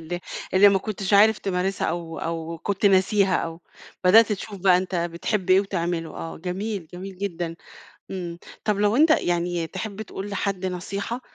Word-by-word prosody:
اللي 175 Hz, +2 st, -5 dB, 0.3 s
اللي 200 Hz, +2 st, +8 dB
ما 195 Hz, -1 st, +3 dB
كنتش 200 Hz, 0 st, -4 dB
عارف 215 Hz, +2 st, +6 dB
تمارسها 190 Hz, 0 st, -1 dB
أو 165 Hz, -1 st, -4 dB
أو 165 Hz, 0 st, -4 dB
كنت 200 Hz, +4 st, 0 dB
ناسيها 195 Hz, 0 st, +4 dB
أو 165 Hz, 0 st, -4 dB, 0.4 s
بدأت 215 Hz, +4 st, +7 dB
تشوف 205 Hz, 0 st, -6 dB
بقى 185 Hz, -1 st, +5 dB
أنت 185 Hz, +1 st, -2 dB
بتحب 175 Hz, +3 st, -1 dB
إيه 185 Hz, +1 st, +7 dB
وتعمله. 170 Hz, -4 st, -2 dB
آه، 165 Hz, -, -6 dB
جميل، 185 Hz, +1 st, -4 dB
جميل 185 Hz, +1 st, -8 dB
جدًا. 175 Hz, -4 st, -3 dB, 0.6 s
امم. 175 Hz, -3 st, -5 dB, 0.3 s
طَب 210 Hz, -2 st, +1 dB
لو 210 Hz, +1 st, +3 dB
أنت 310 Hz, +4 st, +5 dB
يعني 175 Hz, -, +1 dB
تحب 200 Hz, +3 st, -6 dB
تقول 200 Hz, -1 st, -6 dB
لحد 200 Hz, -2 st, -2 dB
نصيحة 200 Hz, +6 st, -4 dB
190 Hz, 165 wpm, -24 LUFS, 175-200 Hz, 0.6 s, اللي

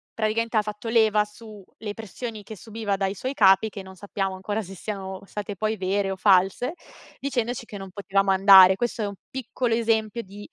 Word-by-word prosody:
praticamente 225 Hz, +1 st, 0 dB
ha -, -, +5 dB
fatto 210 Hz, +2 st, -6 dB
leva 220 Hz, -2 st, +4 dB
su, 210 Hz, -1 st, -13 dB, 0.2 s
le 210 Hz, -2 st, -5 dB
pressioni 220 Hz, +1 st, -7 dB
che 220 Hz, -, -9 dB
subiva 215 Hz, -1 st, -3 dB
dai 195 Hz, 0 st, -1 dB
suoi 260 Hz, +7 st, -4 dB
capi, 195 Hz, +1 st, +5 dB
che 200 Hz, -2 st, -8 dB
non 190 Hz, 0 st, -12 dB
sappiamo 195 Hz, 0 st, -3 dB
ancora 205 Hz, +3 st, -3 dB
se 195 Hz, 0 st, -10 dB
siano 190 Hz, -1 st, -6 dB
state 205 Hz, 0 st, -6 dB
poi 215 Hz, +3 st, -1 dB
vere 195 Hz, +1 st, 0 dB
o -, -, -3 dB
false, 195 Hz, -, +3 dB, 0.5 s
dicendoci 245 Hz, -3 st, -2 dB
che 205 Hz, -, -8 dB
non 195 Hz, -1 st, -9 dB
potevamo 195 Hz, 0 st, 0 dB
andare. 190 Hz, -1 st, +8 dB
Questo 240 Hz, -1 st, -2 dB
è -, -, -1 dB
1 200 Hz, -, -6 dB
piccolo 245 Hz, -2 st, -2 dB
esempio 225 Hz, 0 st, 0 dB
di 205 Hz, +1 st, -12 dB
210 Hz, 195 wpm, -25 LUFS, 195-225 Hz, 0.5 s, andare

